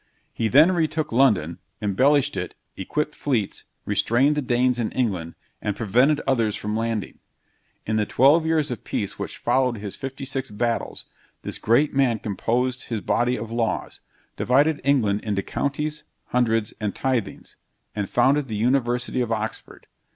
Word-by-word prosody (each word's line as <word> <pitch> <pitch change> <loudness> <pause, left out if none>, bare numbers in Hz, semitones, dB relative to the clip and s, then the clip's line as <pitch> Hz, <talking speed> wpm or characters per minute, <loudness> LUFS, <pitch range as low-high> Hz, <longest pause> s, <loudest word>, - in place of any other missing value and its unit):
He 115 - 0
then 150 - +6
retook 160 -3 -1
London, 100 - +2 0.2
embellished 130 +8 +2
it, - - -4 0.2
equipped 150 +10 -2
fleets, 120 -9 -2 0.2
restrained 130 +6 +2
the 150 - 0
Danes 125 -1 +1
in 115 - 0
England, 95 -10 -2 0.3
and 105 - -2
prevented 125 +8 +3
others 115 -6 +1
from 105 +1 -3
landing. 115 -2 -3 0.7
In 110 0 0
the 105 -1 0
twelve 145 +6 +5
years 160 -3 +1
of 120 - -5
peace - - -4
which - - -4
followed 125 0 +1
his 100 -1 -6
fifty 135 +1 -6
six 135 0 -3
battles, 115 +2 -2 0.4
this - - -4
great 135 +7 +2
man 135 -4 +2
composed 120 +5 -1
his 115 -3 -3
body 120 +4 +1
of 115 +1 -6
laws; 115 -1 -2 0.4
divided 145 +5 +2
England 115 -7 +2
into 100 -3 -1
counties, 150 +2 -3 0.3
hundreds, 115 -3 +1
and 105 -2 -2
tithings, 125 -7 -2 0.4
and 100 -2 -2
founded 135 +3 +3
the 110 - -4
University 125 +2 +1
of 120 -2 -2
Oxford. 110 0 -4
120 Hz, 150 wpm, -24 LUFS, 110-135 Hz, 0.7 s, then